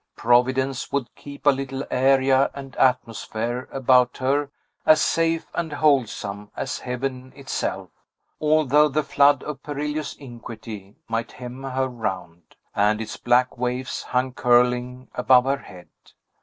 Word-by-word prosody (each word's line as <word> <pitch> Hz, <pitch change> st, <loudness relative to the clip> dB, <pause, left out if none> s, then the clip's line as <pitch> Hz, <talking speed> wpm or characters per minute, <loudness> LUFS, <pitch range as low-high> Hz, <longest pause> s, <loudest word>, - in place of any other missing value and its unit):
Providence 130 Hz, +2 st, +1 dB
would 140 Hz, -4 st, -2 dB
keep 140 Hz, 0 st, -12 dB
a 145 Hz, -, +7 dB
little 135 Hz, 0 st, -4 dB
area 135 Hz, +1 st, +3 dB
and 135 Hz, -1 st, -9 dB
atmosphere 120 Hz, -1 st, 0 dB
about 125 Hz, -2 st, +3 dB
her 140 Hz, +2 st, 0 dB, 0.3 s
as 155 Hz, -1 st, +6 dB
safe 165 Hz, +2 st, +1 dB
and 160 Hz, -3 st, -3 dB
wholesome 115 Hz, -9 st, 0 dB
as 135 Hz, -, -3 dB
heaven 130 Hz, +1 st, -4 dB
itself, 140 Hz, -1 st, -4 dB, 0.5 s
although 150 Hz, -1 st, +4 dB
the 150 Hz, +2 st, 0 dB
flood 140 Hz, -1 st, +3 dB
of 150 Hz, -2 st, -6 dB
perilous 150 Hz, +1 st, -4 dB
iniquity 115 Hz, -5 st, -10 dB
might 115 Hz, +1 st, -3 dB
hem 125 Hz, +1 st, -8 dB
her 130 Hz, 0 st, -1 dB
round, 90 Hz, -9 st, -6 dB, 0.2 s
and 105 Hz, +1 st, +2 dB
its 110 Hz, -1 st, -5 dB
black 125 Hz, +1 st, +1 dB
waves 125 Hz, +1 st, -2 dB
hang 125 Hz, 0 st, -1 dB
curling 125 Hz, +1 st, +2 dB
above 125 Hz, 0 st, +4 dB
her 135 Hz, +1 st, +1 dB
head! 90 Hz, -8 st, -13 dB
130 Hz, 130 wpm, -23 LUFS, 120-140 Hz, 0.5 s, a